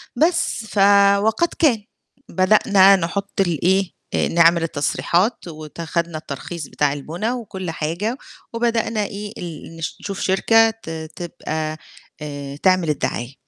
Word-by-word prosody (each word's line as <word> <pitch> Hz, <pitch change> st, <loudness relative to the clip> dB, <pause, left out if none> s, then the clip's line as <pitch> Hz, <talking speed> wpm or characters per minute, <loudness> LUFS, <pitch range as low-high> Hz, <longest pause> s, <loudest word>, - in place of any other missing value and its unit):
بس 330 Hz, -8 st, +1 dB
ف 215 Hz, -, -9 dB, 0.5 s
وقد 220 Hz, +10 st, +2 dB
كان، 240 Hz, -10 st, +3 dB, 0.5 s
بدأنا 195 Hz, 0 st, +5 dB
نحط 195 Hz, +3 st, -2 dB
الإيه، 185 Hz, +2 st, +1 dB, 0.2 s
آآ -, -, +1 dB
نعمل 170 Hz, 0 st, +4 dB
التصريحات 170 Hz, +7 st, 0 dB
وت 155 Hz, 0 st, -9 dB
خدنا 170 Hz, 0 st, -2 dB
الترخيص 155 Hz, +2 st, -7 dB
بتاع 145 Hz, -1 st, 0 dB
البُنا 170 Hz, -, -3 dB
وكلّ 190 Hz, -8 st, -5 dB
حاجة، 170 Hz, +11 st, -3 dB, 0.4 s
وبدأنا 230 Hz, -2 st, 0 dB
إيه 205 Hz, +1 st, -7 dB
ال 165 Hz, -1 st, -8 dB
نش 165 Hz, -, -5 dB
نشوف 200 Hz, -1 st, -5 dB
شركة 225 Hz, +4 st, +4 dB
ت 225 Hz, -6 st, -10 dB, 0.3 s
تبقى 155 Hz, -2 st, -4 dB, 0.4 s
آآ 145 Hz, -2 st, -6 dB
تعمل 185 Hz, -3 st, +3 dB
الدعاية، 130 Hz, -3 st, -2 dB
180 Hz, 125 wpm, -21 LUFS, 160-215 Hz, 0.5 s, بدأنا